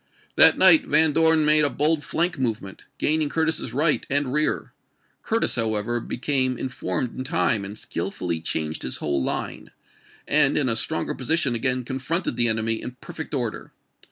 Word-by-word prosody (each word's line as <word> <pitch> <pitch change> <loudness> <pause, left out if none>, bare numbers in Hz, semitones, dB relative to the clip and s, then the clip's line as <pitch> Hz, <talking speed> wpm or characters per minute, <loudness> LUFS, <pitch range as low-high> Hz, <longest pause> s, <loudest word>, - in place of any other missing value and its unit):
That - - +7
night 300 -3 +6
Van 155 0 +4
Dorn 160 0 +3
made 150 0 +4
a 145 - +2
bold 150 +2 +1
flank 170 -2 -1
movement, 110 -6 -4
gaining 155 -1 +1
Curtis's 160 -6 -2
right 150 +5 +2
and 140 -2 +1
rear. 150 +1 -1 0.5
Curtis, 225 +1 -1
however, 115 0 -1
became 130 +1 -1
informed 125 -2 -4
in 130 - -5
time, 130 - 0
and 100 +2 -8
skillfully 85 -4 -5
changed 80 -1 -3
his 65 - -4
whole 70 -3 -2
line, - - -4 0.6
and 145 -2 +3
in 145 - +1
a 115 - +3
stronger 160 +7 -2
position 135 0 0
again 125 +1 -1
confronted 135 +4 -2
the 120 0 +2
enemy 110 0 0
in 125 - -7
perfect 160 -3 -7
order. 120 -5 -5
130 Hz, 160 wpm, -23 LUFS, 115-155 Hz, 0.6 s, That